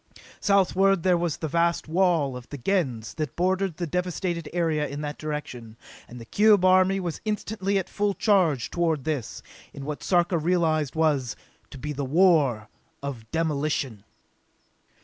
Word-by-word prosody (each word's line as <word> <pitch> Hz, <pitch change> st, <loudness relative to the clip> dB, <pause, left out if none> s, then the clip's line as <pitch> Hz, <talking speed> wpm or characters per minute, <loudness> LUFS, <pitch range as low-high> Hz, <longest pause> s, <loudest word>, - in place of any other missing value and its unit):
Southward 195 Hz, -2 st, +3 dB
there 185 Hz, -1 st, +4 dB
was 170 Hz, -3 st, -1 dB
the 160 Hz, -, -3 dB
vast 170 Hz, +2 st, +1 dB
wall 165 Hz, -5 st, +2 dB
of 125 Hz, -1 st, -10 dB
the 145 Hz, -, -6 dB
Gens 125 Hz, -, -1 dB
that 155 Hz, -5 st, -3 dB
bordered 185 Hz, -1 st, 0 dB
the 175 Hz, -, -2 dB
devasted 175 Hz, 0 st, -2 dB
area 160 Hz, -3 st, 0 dB
in 145 Hz, +2 st, -6 dB
that 150 Hz, 0 st, -5 dB
direction, 125 Hz, -7 st, -6 dB, 0.3 s
and 125 Hz, -, -10 dB
the 115 Hz, -, -10 dB
cube 205 Hz, -, +4 dB
army 185 Hz, +1 st, +4 dB
was 175 Hz, -4 st, -4 dB
instantly 205 Hz, -2 st, -1 dB
at 190 Hz, -1 st, -2 dB
full 205 Hz, -1 st, -1 dB
charge 180 Hz, -, +2 dB
toward 165 Hz, -5 st, 0 dB
this, 145 Hz, -6 st, -4 dB, 0.3 s
in 140 Hz, -, -8 dB
what 150 Hz, 0 st, -5 dB
Sarka 175 Hz, -1 st, +2 dB
realized 160 Hz, -4 st, +1 dB
was, 145 Hz, -8 st, +1 dB, 0.3 s
to -, -, -10 dB
be 150 Hz, +3 st, -5 dB
a 140 Hz, -, -3 dB
war 140 Hz, -, +3 dB, 0.4 s
of 120 Hz, -6 st, -6 dB
demolition! 145 Hz, -8 st, -1 dB
160 Hz, 155 wpm, -25 LUFS, 140-185 Hz, 0.4 s, there